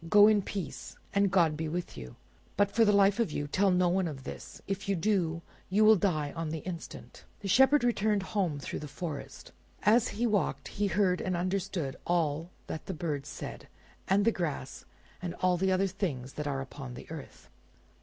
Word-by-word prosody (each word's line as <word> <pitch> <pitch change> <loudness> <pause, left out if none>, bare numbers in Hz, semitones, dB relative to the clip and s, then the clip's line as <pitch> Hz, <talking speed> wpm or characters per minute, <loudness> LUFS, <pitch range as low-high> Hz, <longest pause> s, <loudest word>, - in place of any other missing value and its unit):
Go 205 +2 +8
in 215 -1 +4
peace, 190 -3 -6 0.2
and 200 0 +3
God 170 -5 +3
be 160 +1 -3
with 175 +3 -4
you! 65 0 -9 0.4
but 205 -1 +3
for 230 - +4
the 210 - +5
life 200 +1 +4
of 230 -9 +1
you, 145 - -2
tell 195 +7 +2
no 180 -1 +3
one 180 +1 +1
of 140 -4 -7
this; - - -8
if 195 0 -4
you 195 - +3
do, 170 -3 0 0.3
you 210 +3 +4
will 220 0 +8
die 155 -7 0
on 165 -1 -3
the 160 - -3
instant!" 175 -3 -8 0.2
The 200 - -4
Shepherd 265 +7 +5
returned 215 -4 +2
home 185 -7 -1
through - - -5
the 150 - -6
forest. 150 0 -7 0.3
As 225 +4 +5
he 230 +4 -2
walked 175 - 0
he 205 0 -1
heard 190 -2 +2
and 185 -2 -1
understood 180 -5 -2
all 165 -1 0 0.2
that 155 - -6
the 190 - -3
birds 150 -3 -3
said, - - -7 0.4
and 200 +2 +3
the 230 - +5
grass 155 - -4 0.4
and 175 -1 -4
all 185 0 +2
the 190 +2 +1
other 190 +1 +3
things 155 -10 -3
that 150 -1 -4
are 135 -2 -1
upon 135 -2 -8
the - - -9
earth. 160 -4 -9
180 Hz, 200 wpm, -30 LUFS, 155-200 Hz, 0.4 s, Go